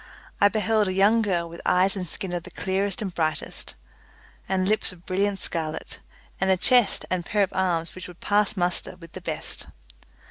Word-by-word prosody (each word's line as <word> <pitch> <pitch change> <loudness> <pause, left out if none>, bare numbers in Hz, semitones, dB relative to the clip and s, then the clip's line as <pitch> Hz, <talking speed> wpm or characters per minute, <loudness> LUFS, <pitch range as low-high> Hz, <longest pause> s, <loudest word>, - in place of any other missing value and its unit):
I 200 - +8
beheld 215 0 +2
a 185 - -1
young 205 +4 +4
girl 180 -5 0
with 170 0 -9
eyes 185 +2 +3
and 185 -2 -4
skin 185 +2 -5
of 175 - -1
the - - -11
clearest 195 +1 -2
and 190 -3 -4
brightest, 160 -2 -3 0.7
and 190 -1 +1
lips 215 0 +3
of 180 -1 -15
brilliant 195 +2 0
scarlet, 160 -3 -3 0.4
and 190 - +1
a 190 - +4
chest 245 +4 +4
and 180 -1 0
pair 205 +3 +1
of 190 - -2
arms 175 -3 0
which 185 -1 -8
would 180 -1 -13
pass 205 0 +2
muster 175 0 0
with 165 -2 -14
the 185 - -8
best. 160 -3 -4
185 Hz, 190 wpm, -25 LUFS, 175-200 Hz, 0.7 s, I